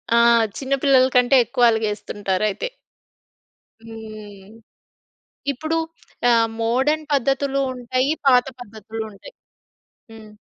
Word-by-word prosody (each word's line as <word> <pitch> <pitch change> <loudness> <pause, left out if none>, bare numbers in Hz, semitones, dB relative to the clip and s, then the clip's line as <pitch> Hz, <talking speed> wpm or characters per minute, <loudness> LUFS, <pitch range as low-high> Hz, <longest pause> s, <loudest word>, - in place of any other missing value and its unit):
ఆ! - - +4 0.4
చిన్నపిల్లల 270 -1 +3
కంటే 250 +2 +4
ఎక్కువ 245 +2 -1
అలిగేస్తుంటారు 210 -2 -2
అయితే. 205 - -4 1.2
హ్మ్. 215 -3 -11 1.0
ఇప్పుడు 315 +5 -3 0.5
ఆహ్, 230 -1 +3
మోడర్న్ 265 +7 0
పద్ధతులు 275 0 0
ఉంటాయి, 255 +2 -1 0.2
పాత 250 -2 +5
పద్ధతులుంటాయి 220 - -9 0.8
హ్మ్. 220 -1 -13
240 Hz, 85 wpm, -21 LUFS, 220-270 Hz, 1.2 s, పాత